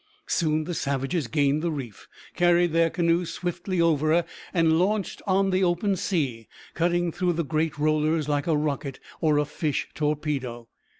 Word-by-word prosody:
Soon 155 -2 +1
the 175 +3 -4
savages 140 +1 -1
gained 145 +1 +1
the 170 - 0
reef, 130 -9 -6 0.3
carried 175 -1 +3
their 165 0 +4
canoe 170 +1 +1
swiftly 175 +2 -3
over, 160 0 +3 0.3
and 165 -2 +3
launched 200 +2 0
on 195 0 +2
the 185 +1 +2
open 180 +3 +1
sea, 145 - -2 0.3
cutting 175 +1 +1
through 180 +1 0
the 165 -1 -2
great 155 +3 -1
rollers 155 0 +1
like 145 0 0
a 160 -2 +3
rocket 140 -2 -2 0.2
or 155 -2 +2
a 150 - +2
fish 150 0 -2
torpedo. 145 -6 -2
160 Hz, 160 wpm, -26 LUFS, 150-175 Hz, 0.3 s, their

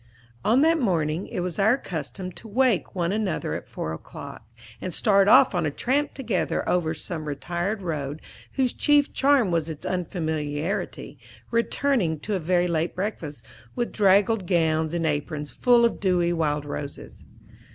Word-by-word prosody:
On 240 +5 +4
that 325 +1 +4
morning 170 - 0
it 190 - -3
was 175 -1 -3
our 220 +6 +4
custom 170 - -5
to 225 - -10
wake 230 -3 +1
one 175 -1 0
another 210 -2 -1
at - - -5
four 80 - -4
o'clock, 80 - -9 0.4
and 185 - -3
start 200 +2 +3
off 260 +3 +7
on 175 -1 0
a 155 - +1
tramp 275 - -1
together 230 -8 -1
over 165 -3 +1
some 155 0 -5
retired 175 +7 -3
road 150 -3 -3 0.3
whose 260 -3 +1
chief 290 -1 +3
charm 270 -8 +3
was 165 -1 0
its 155 -2 -7
unfamiliarity, 160 -1 -3 0.3
returning 230 - +1
to 210 - -3
a 190 - 0
very 175 +1 +2
late 165 0 -1
breakfast, 170 - -4 0.3
with 240 -1 -1
draggled 200 0 +3
gowns 160 -2 +1
and 165 -1 0
aprons 150 0 -2
full 240 -1 +4
of 235 - 0
dewy 175 -3 +2
wild 150 -3 0
roses. 145 0 -7
180 Hz, 160 wpm, -25 LUFS, 160-220 Hz, 0.4 s, off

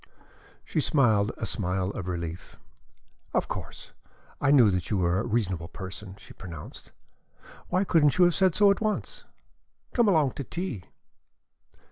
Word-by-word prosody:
She 155 - -1
smiled 115 -9 +3
a - - -3
smile 95 -2 -1
of 95 -3 -6
relief. 85 -1 -5 0.8
"Of - - +1
course - - -7 0.5
I - - +2
knew 125 -7 +6
that 90 -2 -2
you 105 - 0
were 90 0 +1
a 110 - -3
reasonable 95 -7 -1
person," 95 +1 -9
she 100 - -14
pronounced. 85 -5 -10 0.8
"Why 185 +2 +1
couldn't 155 -7 +3
you 180 - +6
have 175 - +3
said 190 -1 +2
so 205 -1 +6
at 200 - -1
once? 225 - -3 0.7
Come 235 -3 +3
along 155 -8 +3
to 140 - -6
tea." 145 - -5
110 Hz, 150 wpm, -27 LUFS, -, 0.8 s, knew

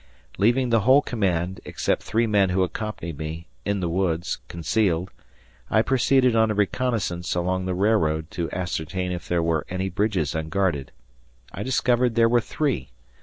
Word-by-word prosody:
Leaving 120 +4 +3
the 115 - +5
whole 130 +7 +5
command, 95 -5 -1
except - - -1
three 115 +2 0
men 100 -3 +3
who 95 +1 +2
accompanied 90 -6 -5
me, 80 +2 -5 0.2
in 100 -1 0
the 90 - 0
woods, 85 -1 -1
concealed, 85 +2 0 0.6
I 110 - +3
proceeded 130 -1 +3
on 110 -1 +4
a 110 - 0
reconnaissance 100 -5 -1
along 90 +1 -1
the 90 - -1
railroad 85 -6 +1
to 85 -2 -3
ascertain 90 0 -3
if 90 -1 -5
there 85 -1 +1
were 80 -2 +1
any 95 +1 -2
bridges 95 -6 0
unguarded. 80 -3 -1 0.6
I 95 - -5
discovered 125 0 +1
there 115 -1 +5
were 120 +1 +3
three. 110 - -2
95 Hz, 160 wpm, -24 LUFS, 85-110 Hz, 0.6 s, the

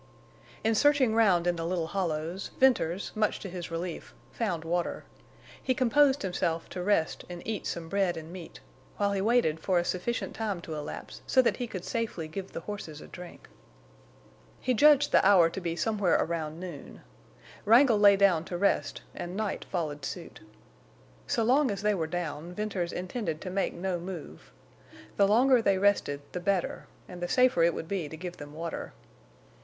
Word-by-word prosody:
In 225 - +3
searching 275 -1 +4
round 195 -7 +4
in 175 -1 +1
the 165 - -3
little 170 0 -1
hollows 170 0 -3
Venters, 200 -9 +2
much 215 -1 +1
to 195 - -6
his 175 -2 -6
relief, 165 +1 -5 0.2
found 170 - -2
water. 175 +1 -1 0.6
He 255 - 0
composed 270 +2 +3
himself 170 -3 -1
to 180 - -5
rest 180 -4 +1
and 175 -1 -8
eat 220 -2 -3
some 165 -1 -4
bread 190 -1 0
and 160 +1 -8
meat, 180 -3 -10 0.4
while 200 -1 +1
he 195 -1 0
waited 215 -8 +2
for 185 +2 +1
a 175 - +1
sufficient 185 +8 -2
time 210 -5 -2
to 160 - -7
elapse 150 -1 -7
so 260 - +3
that - - +1
he 245 - -3
could 185 -5 -6
safely 225 -8 -3
give 190 +4 -6
the - - -6
horses 185 -8 -7
a - - -11
drink. 180 -1 -11 1.1
He 255 - 0
judged 290 +3 +5
the - - +5
hour 185 -4 +6
to 190 - -5
be 170 -1 -2
somewhere 205 -1 +1
around 160 -1 -1
noon. 175 -6 -9 0.6
Wrangle 230 0 +6
lay 205 -1 +7
down 195 -5 +3
to 175 - -4
rest 200 +3 0
and 175 +2 -6
Night 215 -2 -2
followed 150 -6 -3
suit. 170 +5 -6 0.9
So 230 - +1
long 260 +4 +3
as 200 0 -3
they 210 0 +3
were 165 -5 -1
down 170 0 -4
Venters 195 -4 -2
intended 180 -3 -3
to 185 - -5
make 195 +1 -1
no 180 0 -2
move. 170 - -8 0.7
The 200 - +5
longer 245 +4 +5
they 200 -3 +2
rested 190 -8 +2
the 180 - -4
better, 190 0 -1 0.2
and 180 -1 -9
the 175 - -1
safer 250 -4 +3
it 170 0 +4
would 160 - -5
be 180 -6 -3
to 160 - -8
give 180 +1 -7
them 145 0 -10
water. 165 +1 -5
185 Hz, 180 wpm, -29 LUFS, 170-210 Hz, 1.1 s, lay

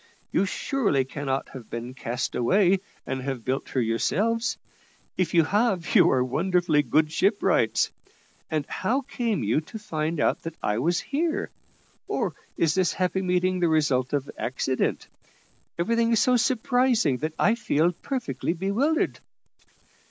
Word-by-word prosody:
You - - +2
surely 200 - 0
cannot 135 0 -3
have 125 -5 -10
been 120 +2 -5
cast 120 -1 -3
away, 185 - +3 0.3
and 130 - -3
have 130 -3 -4
built 130 +2 -2
her 130 - -1
yourselves. 205 - 0 0.6
If 175 -2 -1
you 165 - +6
have, 200 0 0
you - - +6
are 130 -1 +3
wonderfully 160 +3 +2
good 155 +1 +1
shipwrights. 200 +5 +2 0.6
And 155 -3 -1
how 240 - -1
came 235 - -2
you 110 +9 +1
to 160 - -9
find 160 -6 -3
out - - +1
that 165 -1 -6
I 105 +1 0
was 175 +7 +1
here? 315 +3 -2 0.6
or - - -1 0.2
is 160 -2 +2
this 185 -1 +1
happy 185 +1 0
meeting 185 0 +1
the 175 - +3
result 140 -5 +1
of 140 -1 -1
accident? 130 +1 -1 0.7
Everything 230 +6 +1
is 225 - +4
so 250 +2 +4
surprising 245 - +2
that 155 +4 -3
I 215 - +4
feel 175 -7 +1
perfectly 245 -2 -3
bewildered." 210 - 0
170 Hz, 145 wpm, -26 LUFS, 135-220 Hz, 0.7 s, you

